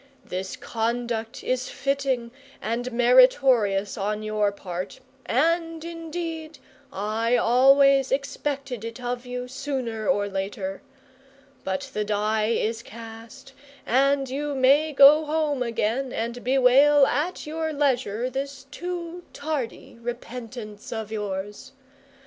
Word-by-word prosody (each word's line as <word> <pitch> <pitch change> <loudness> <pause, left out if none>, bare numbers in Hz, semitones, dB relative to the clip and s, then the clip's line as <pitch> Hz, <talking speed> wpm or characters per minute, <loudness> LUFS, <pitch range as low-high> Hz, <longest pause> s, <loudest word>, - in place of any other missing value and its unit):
This 185 +1 -4
conduct 230 0 -3
is 255 0 -1
fitting 275 -4 -1 0.3
and 245 +3 -3
meritorious 240 -5 +4
on 210 +2 -2
your 215 -1 +1
part, 180 -2 -6 0.3
and 330 +4 +1
indeed 330 -1 -5 0.3
I 220 +4 0
always 270 +3 +5
expected 275 -3 -2
it 230 +1 -6
of 245 0 -4
you, 250 0 -4
sooner 250 -5 -4
or 205 0 +2
later; 195 0 -4 0.8
but 190 +4 -2
the 210 - 0
die 215 +1 0
is 225 0 0
cast, 230 +4 -11 0.3
and 275 +2 +2
you 285 +2 -3
may 280 +4 +4
go 290 +2 +8
home 300 -3 0
again 235 +2 -1
and 235 +2 -4
bewail 270 +3 +5
at 305 +9 -1
your 315 +1 -2
leisure 255 -6 0
this 270 +1 -5
too 350 +1 -5
tardy 285 -6 -4
repentance 235 -2 -7
of 220 -2 -4
yours. 205 +4 -5
250 Hz, 115 wpm, -25 LUFS, 220-280 Hz, 0.8 s, go